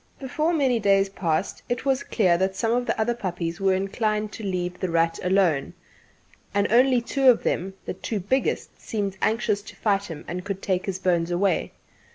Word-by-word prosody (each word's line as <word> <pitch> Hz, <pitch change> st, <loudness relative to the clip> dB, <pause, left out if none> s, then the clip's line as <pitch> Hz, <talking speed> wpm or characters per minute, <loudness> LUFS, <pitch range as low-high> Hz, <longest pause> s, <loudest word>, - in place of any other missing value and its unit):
Before 300 Hz, +5 st, -1 dB
many 270 Hz, -7 st, +2 dB
days 195 Hz, -1 st, +3 dB
passed, 175 Hz, -1 st, -2 dB
it 245 Hz, +2 st, -2 dB
was 270 Hz, -1 st, +2 dB
clear 185 Hz, -6 st, +2 dB
that 190 Hz, 0 st, 0 dB
some 225 Hz, +3 st, 0 dB
of 245 Hz, +1 st, 0 dB
the -, -, -1 dB
other 230 Hz, +2 st, +2 dB
puppies 175 Hz, -5 st, -4 dB
were 190 Hz, -1 st, +3 dB
inclined 210 Hz, +2 st, -1 dB
to 220 Hz, -, -8 dB
leave 180 Hz, -2 st, -3 dB
"The 185 Hz, -, -2 dB
Rat" 165 Hz, 0 st, +1 dB
alone, 180 Hz, -6 st, +2 dB, 0.8 s
and 200 Hz, 0 st, +3 dB
that -, -, -1 dB
only 250 Hz, 0 st, +5 dB
two 265 Hz, +2 st, +3 dB
of 240 Hz, -, +4 dB
them 190 Hz, +2 st, -1 dB
the -, -, -3 dB
two 205 Hz, +3 st, -4 dB
biggest 255 Hz, +8 st, -1 dB
seemed 200 Hz, -3 st, -3 dB
anxious 220 Hz, -2 st, +1 dB
to -, -, -12 dB
fight 200 Hz, -2 st, +1 dB
him 165 Hz, -6 st, -8 dB
and 180 Hz, +1 st, -4 dB
could 195 Hz, 0 st, -5 dB
take 185 Hz, -1 st, -1 dB
his 190 Hz, -2 st, -2 dB
bones 175 Hz, -3 st, +1 dB
away. 180 Hz, 0 st, 0 dB
195 Hz, 200 wpm, -25 LUFS, 180-230 Hz, 0.8 s, only